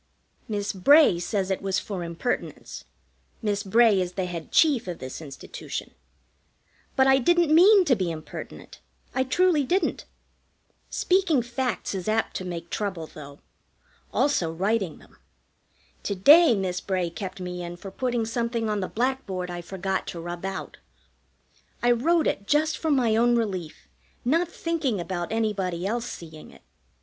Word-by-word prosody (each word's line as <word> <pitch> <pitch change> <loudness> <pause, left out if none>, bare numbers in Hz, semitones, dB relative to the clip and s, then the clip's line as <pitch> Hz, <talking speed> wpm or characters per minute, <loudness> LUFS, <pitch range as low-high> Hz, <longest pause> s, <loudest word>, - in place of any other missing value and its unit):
Miss 205 -1 -2
Bray 240 - +6
says 195 +1 -1
it 190 - -1
was 195 -1 0
for 185 -2 -4
impertinence 170 +8 -4 0.6
(Miss 205 -2 0
Bray 210 0 +4
is 180 0 -3
the 190 -1 -2
Head 170 -3 -6
Chief 285 - +3
of 175 -2 -4
this 130 +4 -7
Institution), 140 -3 -7 1.0
but 265 - +4
I 265 0 +5
didn't 340 +3 +3
mean 380 +4 +7
to 270 -6 +4
be 185 -4 -1
impertinent. 155 -2 -8 0.3
I 260 - +1
truly 320 +3 +2
didn't. 350 +4 0 0.8
Speaking 360 -8 +2
facts 245 -1 -3
is 190 -1 -4
apt 220 +1 0
to - - -5
make 170 -1 -6
trouble, 190 -6 -3
though 145 -2 -12 0.7
also 185 - +1
writing 195 0 -1
them. - - -20 0.8
To 200 - -2
day 290 - +7
Miss 185 -2 -2
Bray 185 -3 -1
kept 190 +1 -6
me 180 -1 -5
in 175 0 -7
for 195 +2 -9
putting 240 -1 -1
something 230 -1 -1
on 210 - -1
the 185 - -2
blackboard 215 -8 -2
I 175 0 -5
forgot 190 +2 -3
to 170 - -5
rub 175 +1 -6
out. 195 - -5 1.1
I 240 - +5
wrote 315 +7 +2
it 200 - -1
just 310 +1 +2
for 320 - -3
my 250 -6 +3
own 240 +1 +4
relief, 190 -9 -3 0.4
not 330 +7 +2
thinking 325 - -2
about 175 0 -4
anybody 195 -6 -1
else 235 +4 -2
seeing 160 -2 -10
it. - - -18
205 Hz, 155 wpm, -25 LUFS, 180-260 Hz, 1.1 s, mean